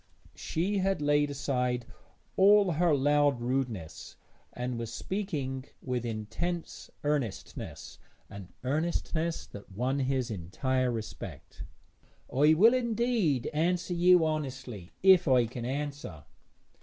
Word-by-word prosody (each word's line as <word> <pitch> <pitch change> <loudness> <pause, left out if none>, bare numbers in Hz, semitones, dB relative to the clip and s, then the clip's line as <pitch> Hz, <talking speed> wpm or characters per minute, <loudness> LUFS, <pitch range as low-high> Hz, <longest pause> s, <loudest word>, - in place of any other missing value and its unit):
She 195 +5 -1
had 195 -1 +1
laid 145 0 +2
aside 125 -3 -1 0.5
all 200 -1 +6
her 170 +1 +2
loud 145 -1 +3
rudeness, 120 -9 -3 0.4
and 125 -1 -4
was 115 -1 -5
speaking 140 - -3
with 125 -2 -3
intense 115 +11 -4
earnestness 145 -9 -4 0.3
an 95 -3 -10
earnestness 160 +3 -1
that 100 -1 -12
won 125 +7 -1
his 130 -2 0
entire 125 - -1
respect. 110 -2 -7 0.7
'I 150 +4 +5
will 220 +9 +6
indeed 235 - +1
answer 175 +3 0
you 175 -1 +5
honestly, 135 - -4
if 190 -3 +6
I 125 -3 +5
can 120 +1 -6
answer.' 140 - -4
140 Hz, 110 wpm, -30 LUFS, 125-170 Hz, 0.7 s, all